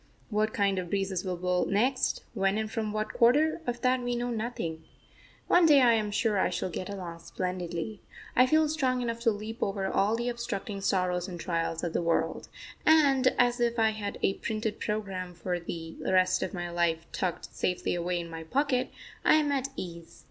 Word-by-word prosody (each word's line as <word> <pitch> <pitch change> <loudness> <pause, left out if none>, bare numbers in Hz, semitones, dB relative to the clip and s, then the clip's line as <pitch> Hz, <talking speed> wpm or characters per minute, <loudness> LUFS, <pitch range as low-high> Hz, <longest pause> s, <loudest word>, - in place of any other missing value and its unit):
What 215 +1 +1
kind 200 -2 +1
of 180 -2 -5
breezes 195 -2 -1
will 185 -2 -3
blow 180 0 +1
next, 250 +7 +1
when 195 -1 +1
and 220 0 -2
from 220 -2 -2
what 215 0 -2
quarter 300 +8 +4
of 240 0 -2
that 255 0 +2
we 245 0 -1
know 240 0 -2
nothing. 220 -9 -3 0.6
One 350 -1 +6
day 295 -3 +7
I 245 -3 +6
am 215 -2 +1
sure 210 -1 +1
I - - +2
shall 185 - -3
get 185 +4 -5
along 180 -4 -6
splendidly; 180 +3 -4 0.3
I 255 +1 +6
feel 310 +3 +4
strong 260 -5 0
enough 230 -1 -2
to 235 0 +3
leap 215 +2 -4
over 195 -1 -1
all 200 +3 +2
the 235 +1 -2
obstructing 235 -4 -4
sorrows 180 -2 0
and 175 -2 -7
trials 165 -1 -2
of 170 -2 -2
the - - +1
world; 170 -1 0 0.3
and, 280 -5 +5
as 245 0 +3
if 235 0 +1
I 220 -1 +4
had 205 -2 -5
a 195 - +3
printed 215 0 -3
programme 195 -4 -3
for 175 +1 -2
the 165 -1 -7
rest 185 0 +3
of - - -2
my 175 -3 -4
life 170 -1 0
tucked 180 -3 -3
safely 180 - -1
away 175 0 -1
in 170 - -5
my 165 -1 -7
pocket, 255 - 0 0.3
I - - +6
am 300 -2 +2
at 270 -1 0
ease. 170 -2 -8
205 Hz, 200 wpm, -29 LUFS, 180-240 Hz, 0.6 s, day